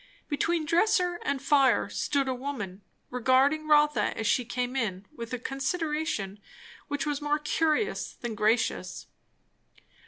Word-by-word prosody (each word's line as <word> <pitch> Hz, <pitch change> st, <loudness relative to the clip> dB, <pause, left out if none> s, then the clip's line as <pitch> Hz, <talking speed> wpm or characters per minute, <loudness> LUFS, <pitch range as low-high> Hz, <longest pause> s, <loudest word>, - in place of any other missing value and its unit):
Between 325 Hz, +2 st, 0 dB
dresser 355 Hz, +1 st, +2 dB
and 280 Hz, -1 st, -1 dB
fire 275 Hz, 0 st, +3 dB
stood 280 Hz, -2 st, -1 dB
a 260 Hz, -, 0 dB
woman, 245 Hz, -8 st, -5 dB, 0.3 s
regarding 260 Hz, +5 st, +3 dB
Rotha 300 Hz, 0 st, +3 dB
as 220 Hz, -, -2 dB
she 245 Hz, +4 st, +2 dB
came 245 Hz, +2 st, -3 dB
in 200 Hz, -7 st, -2 dB
with 230 Hz, -4 st, -7 dB
a 250 Hz, -, -1 dB
consideration 270 Hz, -, -2 dB, 0.5 s
which 290 Hz, 0 st, -2 dB
was 295 Hz, 0 st, -2 dB
more 295 Hz, 0 st, +1 dB
curious 320 Hz, +6 st, 0 dB
than 240 Hz, -2 st, -5 dB
gracious. 215 Hz, +2 st, 0 dB
275 Hz, 130 wpm, -28 LUFS, 245-305 Hz, 0.5 s, fire